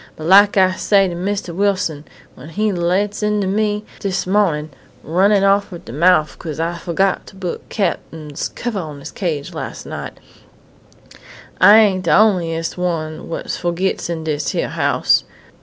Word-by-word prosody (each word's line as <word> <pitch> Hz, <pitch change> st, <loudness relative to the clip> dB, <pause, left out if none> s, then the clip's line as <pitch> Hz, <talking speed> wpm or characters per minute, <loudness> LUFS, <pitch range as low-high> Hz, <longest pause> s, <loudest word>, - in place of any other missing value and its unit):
But 155 Hz, -, -8 dB
lak 200 Hz, +3 st, +6 dB
I 185 Hz, -1 st, +5 dB
say 195 Hz, +1 st, +2 dB
to 175 Hz, -, -4 dB
Mistah 185 Hz, 0 st, -3 dB
Wilson, 185 Hz, -6 st, -1 dB, 0.3 s
when 135 Hz, +5 st, -12 dB
he 210 Hz, +5 st, 0 dB
lights 190 Hz, +4 st, 0 dB
into 210 Hz, -1 st, 0 dB
me 210 Hz, +2 st, -1 dB
dis 195 Hz, -1 st, -2 dB
mawnin', 180 Hz, -6 st, +1 dB, 0.3 s
runnin' 195 Hz, +5 st, +3 dB
off 200 Hz, +1 st, +2 dB
at 175 Hz, -, -9 dB
de -, -, -9 dB
mouf 160 Hz, +1 st, +3 dB
'cause 155 Hz, -2 st, -6 dB
I 165 Hz, +1 st, -1 dB
fo'got 185 Hz, +3 st, 0 dB
to -, -, -13 dB
put 185 Hz, -3 st, -6 dB
Cap'n's 160 Hz, -7 st, -3 dB
covah 225 Hz, -5 st, -4 dB
on 150 Hz, -2 st, -8 dB
his 140 Hz, -, -9 dB
cage 155 Hz, -7 st, -3 dB
las' -, -, -6 dB
night, -, -, -7 dB, 1.4 s
I 205 Hz, +4 st, +9 dB
ain't 195 Hz, -4 st, +3 dB
de -, -, 0 dB
onliest 170 Hz, -6 st, +2 dB
one 160 Hz, -3 st, -3 dB
what 165 Hz, -, -4 dB
fo'gits 175 Hz, +1 st, -2 dB
in 165 Hz, -2 st, -3 dB
dis 150 Hz, -2 st, -2 dB
hyar -, -, -1 dB
house.... -, -, +2 dB
185 Hz, 160 wpm, -18 LUFS, 165-200 Hz, 1.4 s, I